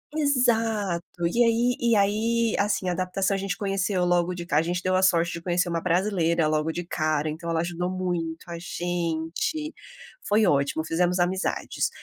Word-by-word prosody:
Exato, 225 - +1
e 235 +7 +3
aí 235 +2 +2
e 235 -2 +3
aí 220 +3 +2
assim 200 -2 0
adaptação 185 +2 0
a 195 - 0
gente 195 -1 -3
conheceu 195 -2 0
logo 175 0 +1
de 170 -1 -6
ca 150 -2 +2
gente 175 +2 -2
deu 185 0 +1
a 185 - +3
sorte 175 -2 +3
de 170 - -6
conhecer 175 0 0
uma 165 -1 -1
brasileira 170 -3 +1
logo 155 +1 0
de 175 +1 -5
cara, 155 -3 -1
então 165 +2 -5
ela 165 -1 +1
ajudou 175 +1 -2
muito 175 -3 -3
a 170 -1 -6
gente, 175 - -3 0.5
foi 210 +1 +3
ótimo, 145 +3 +1
fizemos 175 +3 +1
amizades. 185 +2 -1
180 Hz, 170 wpm, -25 LUFS, 170-200 Hz, 0.5 s, e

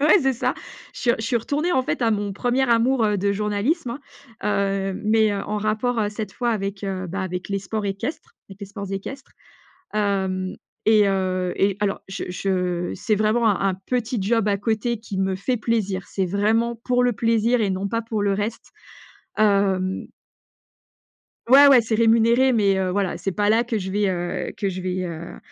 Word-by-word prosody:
ouais, 305 +7 +6
c'est 270 -1 +2
ça. 240 - -1 0.4
Je - - -10
suis 240 - +3
je - - -4
suis 235 - +1
retournée 295 +9 -1
en 260 -6 +2
fait 255 - -2
à 225 - +3
mon 205 -1 -1
1er 245 +5 0
amour, 235 +1 +3
heu, 210 -1 +2
de 200 +1 0
journalisme, 220 - -1 0.4
hein, 195 -1 0
heu, 190 - -6
mais, 220 0 +3
heu, 200 -1 -2
en 210 +1 -2
rapport, 215 +3 0
heu, 205 - +1
cette 210 -2 -6
fois 240 -1 -1
avec, 195 -2 -3
heu, 190 -2 -3
bah, 190 +3 -4
avec 180 -1 -4
les 200 -1 -1
sports 205 +2 -3
équestres 240 +11 -5 0.2
avec 195 - -11
les 200 - -6
sports 200 0 -7
équestres. 265 +8 -6 0.6
Hem, 190 -3 -1 0.3
et, 215 -2 +5
heu, 185 -2 0
et 195 0 +2
alors, 205 -1 0
je 195 - -5
je 180 -2 -1
c'est 215 - 0
vraiment 215 +3 +2
un 195 -1 +1
un - - -2
petit 245 -2 -1
job 215 +1 +1
à 200 - +2
côté 220 +2 -1
qui 205 -3 -6
me 190 0 0
fait 245 +6 -1
plaisir. 205 -4 -1
C'est 190 -2 -1
vraiment 220 +5 +1
pour 250 0 +2
le 245 - +3
plaisir 230 +2 +2
et 205 -3 +1
non 190 +1 -2
pas 230 +1 -1
pour 220 -2 -2
le 200 -1 +2
reste. 210 +3 -4 0.7
Hem 195 -3 +1 1.4
Ouais, 280 +2 +9
ouais, 265 -3 +7
c'est 225 0 -2
rémunéré, 230 +3 +4
mais, 200 -4 +3
heu, 190 -1 0
voilà, 195 -1 -1
c'est 195 - -2
pas 205 +2 0
là 225 +2 +4
que 235 -2 -2
je 190 -1 -5
vais, 205 0 +1
heu, 175 -1 -3
que 200 - -1
je 185 -1 -4
vais 185 0 -2
heu 170 -1 -7
205 Hz, 200 wpm, -23 LUFS, 195-230 Hz, 1.4 s, Ouais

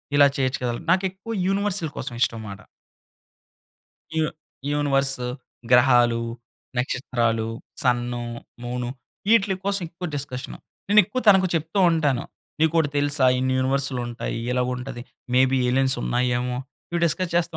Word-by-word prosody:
ఇలా 145 0 +7
చేయొచ్చు 130 0 0
కదా. 120 -1 0 0.2
నాకెక్కువ 190 +4 -1 0.2
యూనివర్సల్ 195 -5 0
కోసం 125 - -4
ఇష్టం 115 -2 +1
మాట. 100 0 -8 1.6
యూ 160 - +3 0.5
యూనివర్స్, 135 -2 +1 0.5
గ్రహాలు, 120 -2 +5 0.6
నక్షత్రాలు, 120 -3 0 0.3
సన్ను, 120 -1 0 0.4
మూను 120 0 -3 0.5
ఇటిలీ 195 -3 +3
కోసం 200 -1 +1
ఎక్కువ 175 +2 -6
డిస్కషను. 135 -2 -5 0.3
నేను 210 +1 +7
ఎక్కువ 215 +7 -3
తనకు 190 -2 +7
చెప్తూ 165 +4 -1
ఉంటాను. 145 -7 +1 0.4
నీకు 160 0 +3
ఒకటి 150 -3 +2
తెలుసా 145 -2 +3
ఇన్ని 130 0 0
యూనివర్స్‌లు 135 0 +1
ఉంటాయి. 120 -1 -4
ఇలాగుంటది. 125 0 -2 0.3
మే 130 - +6
బీ 135 - +3
ఎలియన్స్ 130 +1 +3
ఉన్నాయేమో, 125 0 0 0.3
ఇవి 170 0 -1
డిస్కస్ 170 +2 -1
చేస్తూ 170 -1 0
135 Hz, 125 wpm, -24 LUFS, 125-165 Hz, 1.6 s, ఇలా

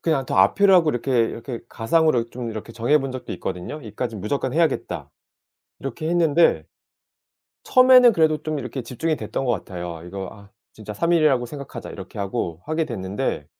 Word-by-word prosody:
그냥 155 -5 0
더 - - -2
앞이라고 180 - +5
이렇게, 125 0 0
이렇게 115 +1 -6
가상으로 125 0 +2
좀 125 -1 -5
이렇게 110 +1 -7
정해본 135 +5 +1
적도 130 - -6
있거든요. 90 +5 -5
'여기까지는 110 -1 -5
무조건 130 +5 -2
해야겠다.' 165 +2 -1 0.7
이렇게 135 +4 -4
했는데 165 - +3 1.0
처음에는 255 -1 +7
그래도 160 -4 +2
좀 155 -1 -2
이렇게 135 -1 -5
집중이 140 +7 -2
됐던 110 +3 -4
것 120 - +2
같아요. 85 -5 -6
'이거 95 0 -6
아 100 -1 -15 0.2
진짜 110 -1 -8
3 170 +12 0
일이라고 145 -7 +3
생각하자.' 140 +2 -8
이렇게 95 +2 -9
하고 95 -5 -3
하게 155 +1 -1
됐는데 100 - -3
125 Hz, 400 characters per minute, -23 LUFS, 105-155 Hz, 1.0 s, 처음에는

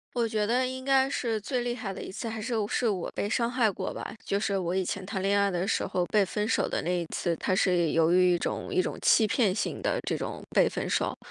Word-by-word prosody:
我 235 -2 +1
觉 215 -1 0
得 250 +3 +2
应 260 0 -5
该 270 0 +4
是 230 -5 -1
最 250 +4 -2
厉 240 0 -2
害 220 -5 -5
的 - - -7
一 - - -7
次， 230 - -5
还 225 0 -5
是 235 +4 -4 0.2
是 245 - 0
我 195 -6 -1
被 205 - -2
伤 235 0 +1
害 245 -3 +2
过 195 - -5
吧。 - - -6
就 200 - -1
是 200 -1 0
我 180 0 -1
以 190 - +1
前 185 - -4
谈 195 -1 -3
恋 200 +1 +2
爱 200 0 +2
的 180 0 -1
时 220 - 0
候 180 - 0
被 210 +2 +3
分 210 +2 -1
手 - - +1
的 - - -2
那 180 +2 0
一 170 - -4
次， 170 +1 -1
它 185 - 0
是 180 -4 +2
有 165 0 +3
一 180 -1 +4
种 - - -3
一 370 -1 +3
种 - - -4
欺 220 - +5
骗 210 -3 +2
性 215 - -2
的 - - 0
这 - - 0
种 - - -5
被 - - +4
分 - - -4
手。 - - 0
205 Hz, 290 characters per minute, -28 LUFS, 185-235 Hz, 0.2 s, 欺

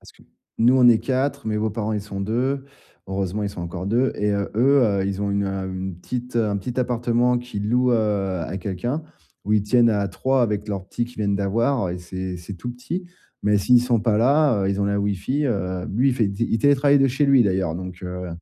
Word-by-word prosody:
Parce - - -16
que - - -22 0.4
nous, 120 +3 +5
on 125 -2 +6
est 115 - +6
4, 135 0 -2
mes 105 -1 -1
beaux-parents, 110 0 -2
ils 105 - -1
sont 100 -1 -7
2. 130 +7 -1 0.4
Heureusement, 95 +1 -2
ils 100 - -2
sont 90 - -8
encore 85 +2 -5
2 120 +6 +1
et 105 0 0
heu, 100 0 -1
eux, 135 +5 +4 0.2
heu, - - 0
ils 100 0 -3
ont 100 0 -1
une, 100 0 0
hem, 95 -1 -3
une 95 -2 -5
petite, 125 +6 -5
heu, 115 -2 +2
un 100 - -1
petit 120 +6 -5
appartement 120 0 +1
qu'ils 105 -4 -5
louent, 125 +2 +2
heu, 100 -5 0
à 85 - -4
quelqu'un, 105 - -3 0.4
où 105 - -1
ils 105 - +3
tiennent 115 +3 +4
à 100 -2 0
3 130 +7 0
avec 105 -2 -1
leur 95 -2 -4
petit 120 - -2
qu'ils 125 - -15
viennent 100 -2 0
d'avoir, 115 +4 0
heu, - - -2
et - - -6
c'est 95 +1 -5
c'est 90 +3 -8
tout 95 +7 -6
petit. 125 +10 -5 0.4
Mais 105 0 +3
s'ils 120 +4 +4
sont 120 -3 +1
pas 105 -1 +1
là, 135 -2 +3
heu, - - +1
ils 100 +1 -1
ont - - +2
la 100 0 0
Wi-Fi, 105 +9 -1
heu, 95 -6 -2
lui, 125 +7 +2
il - - -1
fait, 115 -5 +1
di 100 +4 -2
il 115 - +2
télétravaille 145 +2 +4
de 135 0 +4
chez 135 +4 +1
lui 135 -2 +6
d'ailleurs, 95 -5 0
donc, 90 0 -7
heu 90 0 -5
105 Hz, 245 wpm, -23 LUFS, 100-125 Hz, 0.4 s, on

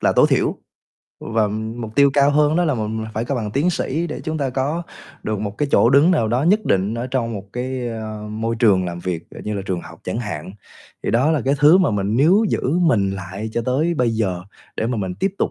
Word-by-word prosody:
là - - +3
tối - - +5
thiểu. - - +1 0.7
Và 110 -2 0
mục 110 +1 -5
tiêu 140 +2 +5
cao 140 0 +5
hơn 150 +2 +3
đó 175 - +3
là 150 - +1
m 120 - -4 0.2
mình 110 - -5
phải 110 - -1
có 140 - -2
bằng 110 -5 -3
tiến 145 - +1
sĩ 160 +1 -2
để 155 - -6
chúng 155 0 -2
ta 135 -2 -1
có 140 +6 -1 0.4
được 110 -2 -2
một 105 -1 -5
cái 145 - 0
chỗ 120 - +5
đứng 140 +6 +5
nào 150 -12 +2
đó 125 +4 +1
nhất 205 +7 +3
định 100 +3 +1
ở 120 +1 -3
trong 125 -3 -2
một 100 -3 -6
cái, 125 0 -3
ơ, 110 -2 -6
môi 115 +2 -2
trường 100 -6 +3
làm 85 -1 -4
việc, 85 -2 -4
à, - - -10
như 105 - -2
là 100 - -3
trường 90 -2 -2
học - - -13
chẳng 95 +5 -3
hạn. 95 -6 -5 0.5
Thì - - -1
đó 125 +8 +3
là 155 -3 +1
cái 135 +1 +2
thứ 150 +5 +7
mà 185 -8 +3
mình 105 +1 -1
níu 180 - +4
giữ - - -1 0.2
mình 115 - +2
lại 95 +3 -6
cho 120 - -1
tới 155 +7 +1
bây 125 -6 +1
giờ 100 -6 -1 0.3
để 110 - -1
mà 125 - -1
mình 95 -4 -3
tiếp 195 -1 +1
tục - - 0
115 Hz, 255 wpm, -20 LUFS, 105-145 Hz, 0.7 s, thứ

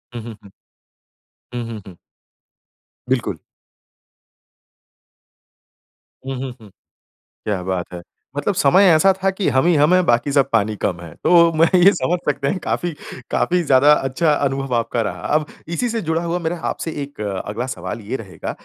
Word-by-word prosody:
हुँ, 120 - -4
हुँ, 115 -2 -8
हुँ। 100 - -15 1.0
हुँ, 120 -1 -3
हुँ, 110 -2 -7
हुँ। 90 -3 -12 1.1
बिल्कुल। 115 -9 0 2.9
हुँ, 135 - -3
हुँ, 135 -1 -4
हुँ। 105 - -14 0.8
क्या 100 -4 -1
बात 90 -1 -3
है? 90 - -6 0.4
मतलब 200 - 0
समय 180 +6 +5
ऐसा 175 +5 +5
था 190 +1 0
कि 190 0 -2
हम 130 +4 +2
ही 175 - +4
हम 150 +4 +4
हैं 185 0 +4
बाकी 120 +2 +2
सब 140 -1 +3
पानी 110 -1 +2
कम 90 -3 -1
हैं। 85 -2 -10
तो 170 -1 +6
मैं 165 +1 +5 0.2
ये 195 - +8
समझ 175 -1 0
सकते 140 -1 -1
हैं - - 0
कि 185 - -4
काफ़ी 175 - -1 0.4
काफ़ी 180 0 +1
ज़्यादा 140 0 +5
अच्छा 150 +3 +1
अनुभव 135 -2 -1
आपका 115 0 0
रहा। 110 - -4
अब 155 - +2 0.3
इसी 245 +7 -1
से 225 -1 -2
जुड़ा 165 +1 0
हुआ 170 +1 -1
मेरा 170 +1 -2
आपसे 165 - -4
एक 140 -5 -10
अगला 105 +3 -3
सवाल 95 -1 -5
ये - - -1
रहेगा 95 -8 -7
135 Hz, 170 wpm, -20 LUFS, 110-170 Hz, 2.9 s, ये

